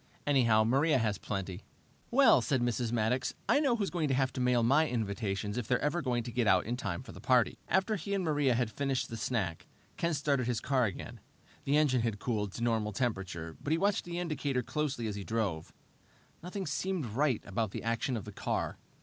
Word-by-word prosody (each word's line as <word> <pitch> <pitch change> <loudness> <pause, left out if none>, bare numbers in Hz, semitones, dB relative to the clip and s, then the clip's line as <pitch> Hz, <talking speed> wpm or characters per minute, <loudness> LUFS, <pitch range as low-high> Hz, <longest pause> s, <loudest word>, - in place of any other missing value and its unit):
Anyhow, 115 -6 +4
Maria 135 +6 +3
has 105 -5 0
plenty." 95 -1 -4 0.5
"Well," 250 - +6
said 130 +4 +1
Mrs. 120 -1 0
Maddox, 120 +2 0
"I - - +4
know 275 -5 +3
who's 205 -4 -1
going 170 -4 0
to 135 - +1
have 135 0 +1
to 130 - -3
mail 125 -1 +3
my 140 +7 +4
invitations 105 -2 -2
if 115 - -5
they're 125 - +3
ever 150 +4 0
to 125 -4 0
get 120 -1 0
out 95 -3 +4
in 120 +3 -1
time 125 0 -4
for - - -10
the - - -11
party!" 125 -3 +3
After 190 +3 +2
he 200 +3 -3
and 195 - -1
Maria 145 -6 +2
had 120 -2 0
finished 135 +2 -1
the 115 - -5
snack, 105 -7 -2 0.3
Ken 170 -1 0
started 140 -4 0
his 120 -3 0
car 130 0 +2
again. 100 - -6 0.5
The 140 +2 +3
engine 135 -5 +3
had 115 -2 -1
cooled 105 -3 -2
to 115 - -4
normal 110 -3 0
temperature, 95 -8 -3
but - - -4
he - - +3
watched 200 +3 +1
the 175 0 -5
indicator 145 -7 -1
closely 145 -3 -2
as 105 - -2
he 100 - -5
drove. 100 -8 -2 0.7
Nothing 185 +3 -5
seemed 185 -6 -2
right 125 +2 0
about 110 +2 -1
the - - -6
action 115 +2 -1
of 105 - -6
the - - -7
car. - - -2
125 Hz, 210 wpm, -31 LUFS, 110-145 Hz, 0.7 s, Well